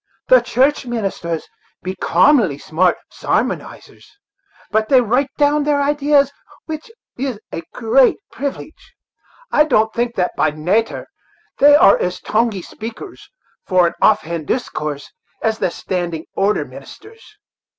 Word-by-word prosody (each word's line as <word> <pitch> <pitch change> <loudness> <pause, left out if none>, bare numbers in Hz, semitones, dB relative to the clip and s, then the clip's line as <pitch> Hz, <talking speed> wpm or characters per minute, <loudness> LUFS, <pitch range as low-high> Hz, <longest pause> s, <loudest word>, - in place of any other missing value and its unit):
"The 255 -1 +7
church 255 +5 +1
ministers 195 -8 -3 0.4
be 185 - -3
commonly 195 - +3
smart 175 +4 +1
sarmonizers, - - -3 0.7
but 215 +1 +1
they 265 - +6
write 250 +4 +1
down 295 0 +3
their 290 -1 +1
idees, 285 -1 +2 0.3
which 315 +3 -7 0.3
is 260 -5 -3
a - - -4
great 245 +3 +3
privilege. 285 +3 -7 0.6
I 300 - +5
don't 220 -7 +1
think 240 0 -2
that, 180 -1 0
by 155 - +2
nater, 180 +10 -1 0.5
they 290 +1 +7
are 200 - +6
as 180 0 -2
tonguey 215 -4 -1
speakers, 230 - -9 0.4
for 185 -2 +4
an 170 - 0
off 215 - +4
hand 165 -2 -5
discourse, 150 - -3 0.3
as 220 -1 0
the - - +1
standing 170 -2 -4
order 200 +2 +1
ministers." 435 -1 -14
225 Hz, 130 wpm, -18 LUFS, 180-280 Hz, 0.7 s, The